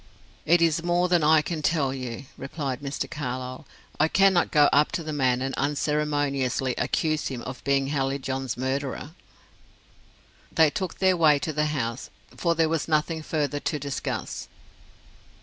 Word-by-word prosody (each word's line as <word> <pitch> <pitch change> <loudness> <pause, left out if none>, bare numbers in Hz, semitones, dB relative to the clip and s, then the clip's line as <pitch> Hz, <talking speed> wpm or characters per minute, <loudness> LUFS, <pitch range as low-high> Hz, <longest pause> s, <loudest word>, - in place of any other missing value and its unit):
"It 170 +1 +5
is 165 0 +2
more 175 +1 +2
than 175 -3 +3
I 155 0 +5
can 160 -1 -3
tell 145 -4 +1
you," 130 0 -6
replied 135 -2 -4
Mr. 140 0 -3
Carlyle. 130 0 -5 0.3
"I 155 - +5
cannot 190 0 +4
go 145 -2 +5
up 145 +1 +4
to 170 - -2
the 155 0 -4
man 130 -3 +1
and 135 0 -2
unceremoniously 145 -3 0
accuse 155 -2 0
him 125 -3 -5
of 130 0 -7
being 140 -1 +1
Hallijohn's 135 -2 -2
murderer." 135 +3 -3 1.4
They 160 -2 +4
took 185 +1 -4
their 190 -1 +3
way 155 -4 +5
to 155 +2 -3
the 150 +1 +1
house, 125 -5 -3 0.3
for 170 -1 +1
there 165 0 +3
was 160 -1 -1
nothing 160 +1 0
further 145 -2 -1
to 150 - -2
discuss. 140 -1 -4
145 Hz, 155 wpm, -26 LUFS, 135-160 Hz, 1.4 s, It